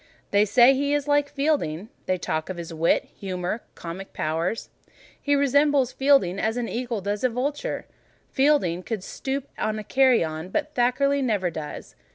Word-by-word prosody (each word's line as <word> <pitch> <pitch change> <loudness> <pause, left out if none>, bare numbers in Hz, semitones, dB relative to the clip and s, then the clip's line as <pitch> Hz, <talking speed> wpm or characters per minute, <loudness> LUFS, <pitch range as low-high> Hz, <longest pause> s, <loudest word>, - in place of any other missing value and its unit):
They 205 +1 +4
say 240 +5 +6
he 285 +2 +1
is 290 -1 -2
like 290 0 +2
Fielding: 275 - -1 0.2
they 185 - +1
talk 160 -2 -3
of 185 - -4
his 170 -1 -6
wit, 165 +1 +2
humour, 185 +2 -3
comic 180 +3 -8
powers. 165 +7 -2 0.5
He 285 0 +2
resembles 280 -1 +3
Fielding 270 -10 +3
as 220 +3 0
an 240 -1 -2
eagle 235 -3 -3
does 205 +3 -3
a 255 - +4
vulture: 275 +5 -3 0.5
Fielding 265 - +2
could 210 0 -4
stoop 270 +6 -4
on 215 0 -1
carrion, 185 -12 +2
but 300 +8 -2
Thackeray 275 +3 +2
never 205 -8 0
does. 155 -2 -7
235 Hz, 160 wpm, -25 LUFS, 180-280 Hz, 0.5 s, say